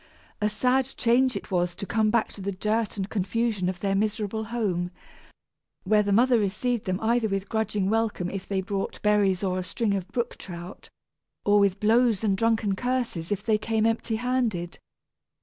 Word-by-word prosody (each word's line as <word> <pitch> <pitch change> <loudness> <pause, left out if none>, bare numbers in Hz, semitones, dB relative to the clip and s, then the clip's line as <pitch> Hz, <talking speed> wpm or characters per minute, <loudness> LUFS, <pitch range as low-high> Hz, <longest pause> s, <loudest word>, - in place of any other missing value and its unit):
A 210 - +2
sad 250 +5 +2
change 250 +2 +3
it - - -6
was 175 -1 0
to - - -6
come 215 +1 +1
back 230 0 +2
to 200 - -10
the 200 +1 -2
dirt 215 +3 -1
and 195 -1 -2
confusion 210 -1 -1
of 185 -1 -5
their 195 -1 0
miserable 215 +1 -1
home, 205 -6 -1 0.9
where 210 +2 +4
the 205 -1 -1
mother 240 +3 +4
received 215 +3 -1
them 185 0 -1
either 230 0 +2
with 195 -1 -2
grudging 215 -3 -1
welcome 220 -4 0
if 195 +1 -5
they 195 -1 0
brought 195 +1 -3
berries 205 -3 +3
or 185 -1 0
a - - -3
string 210 +3 -1
of 190 -2 -2
brook 240 -1 -3
trout, 175 0 -9 0.6
or 205 0 +5
with 200 -1 +2
blows 225 0 +3
and 200 -3 +2
drunken 220 -1 +1
curses 240 -8 -2
if 200 -1 -1
they 215 -2 +2
came 220 0 0
empty 225 0 0
handed. 230 -8 -1
210 Hz, 185 wpm, -26 LUFS, 195-230 Hz, 0.9 s, or